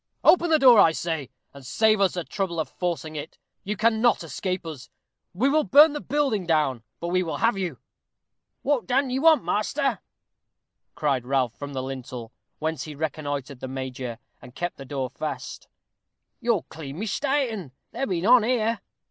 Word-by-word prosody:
Open 345 -2 +5
the 315 - +5
door, 255 -6 +7
I 165 - +6
say, 160 -5 -3 0.2
and 140 -1 -12
save 215 - +2
us 190 -2 +3
the 175 - -2
trouble 175 -1 -3
of 160 - -1
forcing 170 -3 -3
it. 150 +2 -7 0.3
You 205 +1 -3
cannot 225 -1 +3
escape 180 +4 -3
us. 145 -6 -8 0.4
We 225 +9 +1
will 305 +2 +3
burn 290 +2 +7
the 295 - -4
building 255 -9 0
down 150 -7 +1 0.2
but 170 - -3
we 185 +1 +2
will 165 -3 -3
have 230 0 +2
you." 180 -8 -3 0.9
"What 280 -4 0
dun 265 0 +1
you 260 +1 -1
want, 320 -1 +6
measter?" 245 +1 0 1.0
cried 140 -4 0
Ralph, 130 -3 +1
from 145 0 -7
the 130 -1 -3
lintel, 125 -3 -7 0.3
whence 160 0 -3
he 155 -2 -8
reconnoitered 145 -3 -4
the 130 - -5
major, 130 -2 -5 0.2
and 125 - -14
kept 175 0 -3
the 135 - -9
door 135 -1 -3
fast. 155 +3 -6 0.7
"You're 230 -6 +1
clean 145 -2 -9
mista'en. 225 - -1 0.2
There 270 - -2
be 175 -3 -1
none 240 +6 +6
here." 225 -2 0
175 Hz, 175 wpm, -25 LUFS, 145-235 Hz, 1.0 s, door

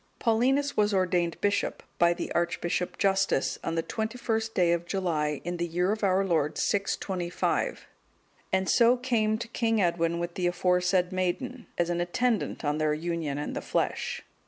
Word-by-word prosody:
Paulinus 260 +5 +2
was 210 -1 +2
ordained 180 -3 +1
bishop 205 0 0 0.2
by 170 0 +5
the - - -5
Archbishop 175 +1 -1
Justus, 195 -6 +1
on 165 - -2
the 165 - 0
21st 225 +1 -2
day 175 -2 +3
of 170 0 -2
July, 155 -6 -1
in 175 +1 -3
the 170 0 -1
year 180 +3 0
of 215 0 -3
our 195 0 +3
Lord 160 -5 0
625, 190 -3 -1 0.7
and 190 0 +1
so 240 +1 +5
came 225 -4 +1
to 230 - -5
King 225 -2 +1
Edwin 170 -2 +1
with 170 0 -3
the 180 0 0
aforesaid 180 +1 +2
maiden 230 +8 -2
as 175 0 +1
an 175 0 0
attendant 215 +1 -1
on 150 +1 0
their 155 -1 +2
union 165 -3 -3
in 145 - -3
the - - -3
flesh. - - -2
180 Hz, 165 wpm, -28 LUFS, 170-215 Hz, 0.7 s, by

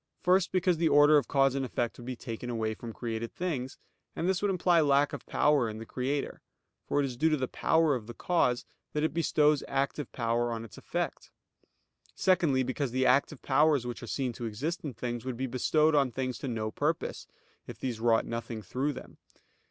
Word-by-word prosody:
First, 185 0 +3
because 185 -2 +2
the 165 0 +2
order 145 +1 +7
of - - -6
cause 135 -1 +3
and 135 0 -1
effect 120 -2 -2
would 120 - -10
be 130 - -3
taken 120 0 -6
away 110 -2 -1
from 115 +2 -8
created 115 0 -4
things: 140 -8 -3 0.4
and 170 - -1
this 190 0 +1
would 205 - +1
imply 180 -2 +3
lack 145 -1 +3
of - - -7
power 145 -6 +2
in 110 - -6
the 115 - -7
Creator: 135 +4 -3 0.5
for - - +1
it 145 - +2
is 130 -2 -4
due 160 +6 +2
to 155 - +2
the 130 -2 -1
power 160 +2 +2
of 115 -5 -4
the 120 - -8
cause, 130 -8 +1 0.3
that 150 - 0
it 160 - 0
bestows 150 -3 +2
active 140 0 -2
power 120 0 0
on 115 0 -4
its 105 - -13
effect. - - -4 0.9
Secondly, 160 -8 +3
because 130 +2 -2
the 130 +2 0
active 135 +2 +2
powers 150 -5 +3
which 120 -1 -5
are 120 - -7
seen 130 +1 -2
to 120 - -6
exist 140 +11 -3
in 140 -6 -5
things, 120 0 -4
would 130 -2 -4
be 130 - -1
bestowed 150 +5 +2
on 140 -4 +3
things 130 0 -3
to 140 - -5
no 110 -3 -2
purpose, - - -2 0.4
if - - -8
these 120 -4 -4
wrought 115 -1 +3
nothing 115 -1 -5
through 135 +9 -2
them. 130 - -11
130 Hz, 210 wpm, -30 LUFS, 120-150 Hz, 0.9 s, order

